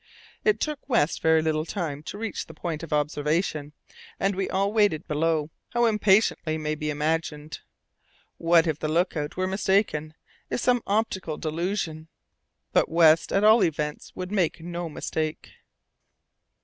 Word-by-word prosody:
It 425 Hz, -2 st, +3 dB
took 300 Hz, -2 st, -2 dB
West 160 Hz, -, +2 dB
very 160 Hz, 0 st, +4 dB
little 155 Hz, -1 st, 0 dB
time 160 Hz, -5 st, -4 dB
to -, -, -6 dB
reach 225 Hz, -2 st, -4 dB
the 160 Hz, -, -12 dB
point 160 Hz, -1 st, -4 dB
of 165 Hz, -, -8 dB
observation, 150 Hz, +1 st, -1 dB, 0.5 s
and 195 Hz, 0 st, +1 dB
we 195 Hz, 0 st, -2 dB
all 200 Hz, +2 st, 0 dB
waited 205 Hz, -8 st, +2 dB
below, 155 Hz, 0 st, 0 dB, 0.2 s
how 240 Hz, 0 st, +3 dB
impatiently 205 Hz, -7 st, +2 dB
may 155 Hz, -1 st, -2 dB
be 150 Hz, 0 st, -3 dB
imagined. 150 Hz, 0 st, -2 dB, 0.8 s
What 165 Hz, 0 st, +4 dB
if 160 Hz, -2 st, -1 dB
the 155 Hz, -, -2 dB
look 170 Hz, +4 st, +1 dB
out 150 Hz, +1 st, -4 dB
were 185 Hz, -, +1 dB
mistaken, 190 Hz, -5 st, 0 dB, 0.3 s
if -, -, -1 dB
some 245 Hz, 0 st, +2 dB
optical 195 Hz, -7 st, -1 dB
delusion? 160 Hz, 0 st, -3 dB, 0.7 s
But -, -, +3 dB
West, 160 Hz, -1 st, +5 dB
at 195 Hz, -, +2 dB
all 215 Hz, 0 st, +6 dB
events, 150 Hz, -3 st, -2 dB
would 185 Hz, +1 st, -5 dB
make 180 Hz, -5 st, +1 dB
no 170 Hz, 0 st, -5 dB
mistake. 155 Hz, 0 st, -4 dB
165 Hz, 150 wpm, -26 LUFS, 155-195 Hz, 0.8 s, all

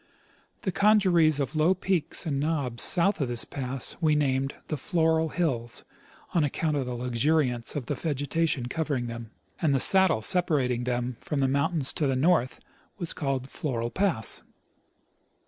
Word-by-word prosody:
The 190 Hz, -, -2 dB
congeries 185 Hz, -7 st, +4 dB
of 140 Hz, +2 st, -3 dB
low 160 Hz, +5 st, +3 dB
peaks 185 Hz, -3 st, 0 dB
and 140 Hz, -4 st, -1 dB
knobs 140 Hz, -6 st, -1 dB
south 185 Hz, 0 st, +4 dB
of 135 Hz, -, 0 dB
this 120 Hz, -1 st, +2 dB
pass 130 Hz, -2 st, -1 dB
we 155 Hz, -2 st, +3 dB
named 135 Hz, -2 st, 0 dB
the 155 Hz, -, -2 dB
Floral 160 Hz, +2 st, +1 dB
hills, 130 Hz, -10 st, -2 dB, 0.5 s
on 170 Hz, -, +2 dB
account 150 Hz, +2 st, -1 dB
of 135 Hz, -3 st, -2 dB
the 125 Hz, -, -4 dB
luxuriance 125 Hz, +1 st, 0 dB
of 140 Hz, -4 st, -3 dB
the -, -, -2 dB
vegetation 145 Hz, -2 st, -1 dB
covering 140 Hz, -2 st, -2 dB
them; 115 Hz, -1 st, -7 dB, 0.3 s
and 150 Hz, -5 st, +2 dB
the -, -, +2 dB
saddle 190 Hz, -, +5 dB
separating 130 Hz, -8 st, 0 dB
them 125 Hz, -1 st, -2 dB
from 150 Hz, -, -4 dB
the 135 Hz, -1 st, +2 dB
mountains 140 Hz, +2 st, 0 dB
to 150 Hz, -, -1 dB
the 135 Hz, -, 0 dB
north 135 Hz, -2 st, +1 dB, 0.4 s
was 170 Hz, -4 st, -3 dB
called 135 Hz, -3 st, -3 dB
Floral 120 Hz, -5 st, -3 dB
pass. 190 Hz, -, 0 dB
145 Hz, 160 wpm, -27 LUFS, 125-165 Hz, 0.5 s, saddle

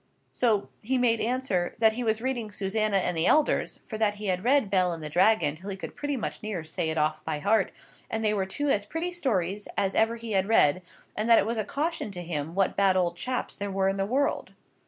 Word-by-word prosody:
So 220 Hz, -5 st, +1 dB
he 260 Hz, +4 st, 0 dB
made 235 Hz, -2 st, +2 dB
answer, 230 Hz, -7 st, -1 dB
'That 220 Hz, -1 st, +4 dB
he 245 Hz, +2 st, -3 dB
was 220 Hz, 0 st, 0 dB
reading 245 Hz, -4 st, -2 dB
Susannah 205 Hz, +1 st, 0 dB
and 180 Hz, -2 st, 0 dB
the 160 Hz, -, +1 dB
Elders, 305 Hz, -1 st, +2 dB
for 220 Hz, -, -6 dB
that 210 Hz, -2 st, +2 dB
he 210 Hz, +1 st, -7 dB
had 185 Hz, -1 st, -1 dB
read 255 Hz, -4 st, +3 dB
Bel 185 Hz, -2 st, +3 dB
and 165 Hz, -2 st, -7 dB
the 150 Hz, -, -5 dB
Dragon 185 Hz, -4 st, +3 dB
till 185 Hz, +6 st, -9 dB
he 195 Hz, -, -4 dB
could -, -, -8 dB
pretty 290 Hz, -3 st, -2 dB, 0.2 s
near 210 Hz, -6 st, -4 dB
say 160 Hz, 0 st, -3 dB
it 160 Hz, -, -2 dB
off 155 Hz, 0 st, 0 dB
by -, -, -2 dB
heart, 200 Hz, +5 st, +2 dB, 0.4 s
and 225 Hz, 0 st, -2 dB
they 215 Hz, -1 st, +2 dB
were 195 Hz, -2 st, -1 dB
two 290 Hz, +9 st, -2 dB
as 205 Hz, -6 st, +2 dB
pretty 325 Hz, +11 st, -3 dB
stories 205 Hz, -, -1 dB
as 195 Hz, -1 st, +1 dB
ever 225 Hz, +1 st, +2 dB
he 230 Hz, -1 st, -7 dB
had 195 Hz, -1 st, +1 dB
read, 185 Hz, -6 st, +4 dB, 0.3 s
and 215 Hz, +2 st, -1 dB
that 230 Hz, -, +8 dB
it -, -, +3 dB
was 230 Hz, +1 st, -2 dB
a -, -, +1 dB
caution 300 Hz, -, -2 dB
to 175 Hz, -1 st, -6 dB
him 165 Hz, -1 st, -4 dB
what 195 Hz, -1 st, +1 dB
bad 195 Hz, -2 st, +3 dB
old 175 Hz, -2 st, +1 dB
chaps 250 Hz, +7 st, -3 dB
there 205 Hz, 0 st, -4 dB
were 195 Hz, 0 st, +1 dB
in 195 Hz, -, -2 dB
the 195 Hz, -, +1 dB
world. 275 Hz, +5 st, 0 dB
210 Hz, 240 wpm, -27 LUFS, 185-230 Hz, 0.4 s, that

